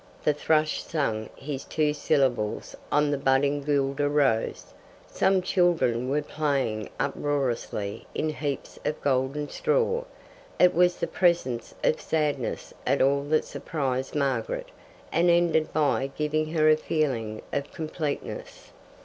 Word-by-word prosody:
The 150 Hz, -, +3 dB
thrush 155 Hz, +1 st, +1 dB
sang 115 Hz, -9 st, -2 dB
his 140 Hz, -1 st, -5 dB
two 150 Hz, -1 st, 0 dB
syllables 135 Hz, -8 st, 0 dB, 0.2 s
on 150 Hz, 0 st, +3 dB
the 145 Hz, -, 0 dB
budding 140 Hz, +2 st, +2 dB
guelder 140 Hz, 0 st, +1 dB
rose. 140 Hz, -6 st, +1 dB, 0.3 s
Some 190 Hz, -1 st, +2 dB
children 165 Hz, -10 st, +2 dB
were 145 Hz, +2 st, +1 dB
playing 135 Hz, -9 st, -1 dB
uproariously 135 Hz, -8 st, -2 dB
in 155 Hz, -, 0 dB
heaps 145 Hz, -2 st, -4 dB
of 150 Hz, -, -2 dB
golden 140 Hz, +2 st, 0 dB
straw. 475 Hz, -, 0 dB, 0.5 s
It 180 Hz, -, +5 dB
was 175 Hz, 0 st, +4 dB
the -, -, -1 dB
presence 170 Hz, -10 st, 0 dB
of -, -, +2 dB
sadness 150 Hz, -6 st, -1 dB
at -, -, +1 dB
all 140 Hz, +1 st, +3 dB
that 155 Hz, +1 st, +2 dB
surprised 135 Hz, -4 st, -3 dB
Margaret, 135 Hz, -6 st, -1 dB, 0.4 s
and 175 Hz, +1 st, +3 dB
ended 170 Hz, -2 st, +3 dB
by 145 Hz, -3 st, +1 dB
giving 155 Hz, +1 st, 0 dB
her 155 Hz, -2 st, +3 dB
a 155 Hz, 0 st, +6 dB
feeling 125 Hz, -10 st, -1 dB
of 140 Hz, 0 st, -2 dB
completeness. 155 Hz, -2 st, -5 dB
145 Hz, 130 wpm, -27 LUFS, 135-155 Hz, 0.5 s, a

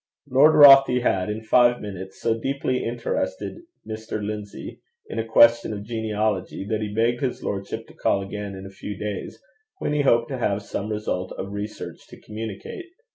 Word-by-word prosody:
Lord 140 Hz, +4 st, +5 dB
Rothie 135 Hz, -4 st, +8 dB
had, 95 Hz, -4 st, +1 dB
in 110 Hz, +1 st, -4 dB
five 120 Hz, +2 st, +4 dB
minutes, 95 Hz, -2 st, -8 dB
so 115 Hz, -, +1 dB
deeply 135 Hz, 0 st, -1 dB
interested 120 Hz, -, -3 dB, 0.3 s
Mr. 110 Hz, 0 st, -5 dB
Lindsay 105 Hz, 0 st, -6 dB, 0.2 s
in 115 Hz, -, -5 dB
a -, -, 0 dB
question 115 Hz, 0 st, +5 dB
of 100 Hz, -1 st, -6 dB
genealogy, 110 Hz, -4 st, -2 dB
that 110 Hz, +1 st, -2 dB
he 105 Hz, -1 st, -3 dB
begged 115 Hz, +3 st, +1 dB
his 130 Hz, -3 st, -2 dB
lordship 100 Hz, +3 st, -4 dB
to -, -, -17 dB
call 100 Hz, -, 0 dB
again 100 Hz, 0 st, -6 dB
in 95 Hz, 0 st, -9 dB
a 95 Hz, -, -9 dB
few 100 Hz, +1 st, -7 dB
days, 105 Hz, 0 st, -5 dB, 0.4 s
when 150 Hz, -, -2 dB
he 150 Hz, -, +2 dB
hoped 120 Hz, -4 st, +3 dB
to 130 Hz, -2 st, -4 dB
have 100 Hz, -3 st, 0 dB
some 100 Hz, +1 st, -4 dB
result 105 Hz, -4 st, -3 dB
of 95 Hz, -, -6 dB
research 105 Hz, +1 st, -7 dB
to -, -, -13 dB
communicate. 110 Hz, -, -7 dB
110 Hz, 180 wpm, -24 LUFS, 100-120 Hz, 0.4 s, Rothie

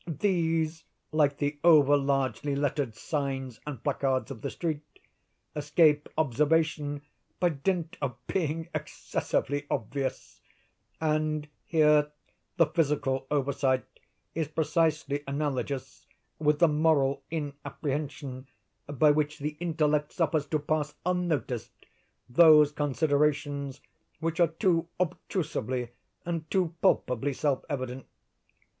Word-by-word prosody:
These, 165 Hz, -2 st, 0 dB, 0.3 s
like 145 Hz, -2 st, +2 dB
the 145 Hz, 0 st, -2 dB
over 150 Hz, -4 st, +7 dB
largely 140 Hz, 0 st, 0 dB
lettered 140 Hz, -4 st, -1 dB
signs 135 Hz, -1 st, -3 dB
and 140 Hz, -6 st, -6 dB
placards 135 Hz, -1 st, 0 dB
of 115 Hz, -5 st, -8 dB
the -, -, -2 dB
street, 160 Hz, -4 st, -3 dB, 0.7 s
escape 150 Hz, 0 st, +3 dB
observation 150 Hz, +1 st, +1 dB, 0.4 s
by 175 Hz, -, +3 dB
dint 170 Hz, +3 st, -2 dB
of 130 Hz, -4 st, -2 dB
being 165 Hz, -2 st, -1 dB
excessively 145 Hz, +1 st, -2 dB
obvious; 135 Hz, +5 st, -3 dB, 0.6 s
and 155 Hz, -1 st, 0 dB, 0.2 s
here 150 Hz, -2 st, +4 dB, 0.5 s
the 165 Hz, -, +6 dB
physical 145 Hz, -4 st, 0 dB
oversight 140 Hz, -2 st, +1 dB, 0.5 s
is 160 Hz, -2 st, -1 dB
precisely 155 Hz, -2 st, 0 dB
analogous 140 Hz, -2 st, -3 dB, 0.3 s
with 150 Hz, -1 st, +3 dB
the 170 Hz, -, +5 dB
moral 150 Hz, -3 st, +2 dB
inapprehension 145 Hz, -3 st, -4 dB, 0.4 s
by 145 Hz, +1 st, +4 dB
which 150 Hz, 0 st, 0 dB
the 150 Hz, +1 st, -4 dB
intellect 150 Hz, -3 st, 0 dB
suffers 160 Hz, -4 st, +1 dB
to 155 Hz, -, +1 dB
pass 150 Hz, 0 st, -1 dB
unnoticed 165 Hz, -10 st, -2 dB, 0.4 s
those 150 Hz, +2 st, +7 dB
considerations 145 Hz, -1 st, 0 dB, 0.4 s
which 165 Hz, +1 st, -2 dB
are 170 Hz, -, +6 dB
too 165 Hz, 0 st, +1 dB
obtrusively 150 Hz, -, -2 dB, 0.4 s
and 165 Hz, -2 st, -3 dB
too 180 Hz, -4 st, +1 dB
palpably 125 Hz, +3 st, +2 dB
self 140 Hz, 0 st, 0 dB
evident. 130 Hz, -2 st, -4 dB
150 Hz, 105 wpm, -28 LUFS, 140-160 Hz, 0.7 s, over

